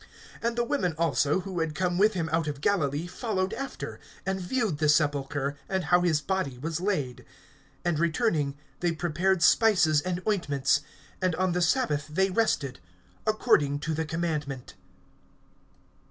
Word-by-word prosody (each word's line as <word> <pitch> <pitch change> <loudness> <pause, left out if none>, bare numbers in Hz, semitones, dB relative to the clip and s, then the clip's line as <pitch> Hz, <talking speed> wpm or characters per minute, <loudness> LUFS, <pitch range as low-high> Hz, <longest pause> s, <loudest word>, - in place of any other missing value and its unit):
(55)And 235 0 0
the 240 - +1
women 235 - 0
also, 155 +1 +2
who 185 -2 -4
had 160 -2 -1
come 180 0 0
with 210 +1 +4
him 165 -3 -1
out 165 -1 +1
of 145 -2 -3
Galilee, 150 -3 +1
followed 190 0 -2
after, 270 +4 -6 0.3
and 190 0 -1
viewed 205 - -1
the 155 -1 +2
sepulchre, 145 -2 +1
and 190 -1 0
how 175 +3 +4
his 165 -4 +2
body 185 -10 -2
was 160 +5 -3
laid. 150 -11 -1 0.6
(56)And 170 -3 +1
returning, 160 - +1 0.2
they 175 -1 +1
prepared 175 +2 +1
spices 180 -8 +5
and 180 +1 -2
ointments; 145 -8 +1 0.4
and 185 -3 +1
on 185 +1 +1
the 180 +1 0
sabbath 165 - +1
they 190 +5 +1
rested, 150 - 0 0.5
according 215 - +3
to 155 +2 -3
the 160 +1 -1
commandment. 155 -5 -3
170 Hz, 155 wpm, -28 LUFS, 150-190 Hz, 0.6 s, spices